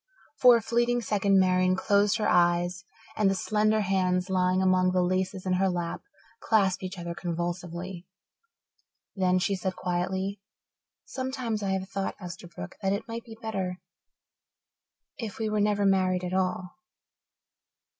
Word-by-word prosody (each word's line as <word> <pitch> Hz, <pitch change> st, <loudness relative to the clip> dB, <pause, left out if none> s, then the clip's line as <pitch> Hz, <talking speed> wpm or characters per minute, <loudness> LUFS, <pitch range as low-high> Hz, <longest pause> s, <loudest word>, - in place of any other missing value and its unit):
For 250 Hz, -1 st, +7 dB
a 230 Hz, -, -4 dB
fleeting 240 Hz, +1 st, +1 dB
second 200 Hz, -1 st, +2 dB
Marian 185 Hz, 0 st, +3 dB
closed 200 Hz, +1 st, +2 dB
her 215 Hz, -, 0 dB
eyes 175 Hz, +1 st, +2 dB, 0.3 s
and 210 Hz, -2 st, +3 dB
the 195 Hz, -, +1 dB
slender 215 Hz, +2 st, +1 dB
hands, 185 Hz, -1 st, 0 dB
lying 185 Hz, 0 st, +2 dB
among 185 Hz, -1 st, +3 dB
the 180 Hz, -1 st, +3 dB
laces 185 Hz, +1 st, -1 dB
in 185 Hz, -, +1 dB
her 190 Hz, +1 st, +2 dB
lap, 175 Hz, -2 st, -3 dB, 0.4 s
clasped 200 Hz, -, +2 dB
each 185 Hz, 0 st, -6 dB
other 170 Hz, -1 st, -5 dB
convulsively. 175 Hz, +1 st, -4 dB, 1.1 s
Then 185 Hz, -2 st, +2 dB
she 195 Hz, +2 st, +1 dB
said 185 Hz, 0 st, -3 dB
quietly, 190 Hz, +2 st, -2 dB, 0.6 s
"Sometimes 255 Hz, -4 st, -3 dB
I 200 Hz, -, -2 dB
have 190 Hz, 0 st, -2 dB
thought, 195 Hz, 0 st, -3 dB
Esterbrook, 175 Hz, -, -9 dB
that 195 Hz, 0 st, +1 dB
it 200 Hz, +3 st, -4 dB
might 230 Hz, 0 st, -5 dB
be 225 Hz, -2 st, -11 dB
better 190 Hz, -4 st, -3 dB, 1.4 s
if 220 Hz, -5 st, -5 dB
we 220 Hz, -1 st, -1 dB
were 210 Hz, -1 st, +1 dB
never 205 Hz, -1 st, +2 dB
married 185 Hz, -2 st, +2 dB
at 180 Hz, 0 st, -3 dB
all." 185 Hz, -1 st, -1 dB
190 Hz, 145 wpm, -27 LUFS, 180-205 Hz, 1.4 s, For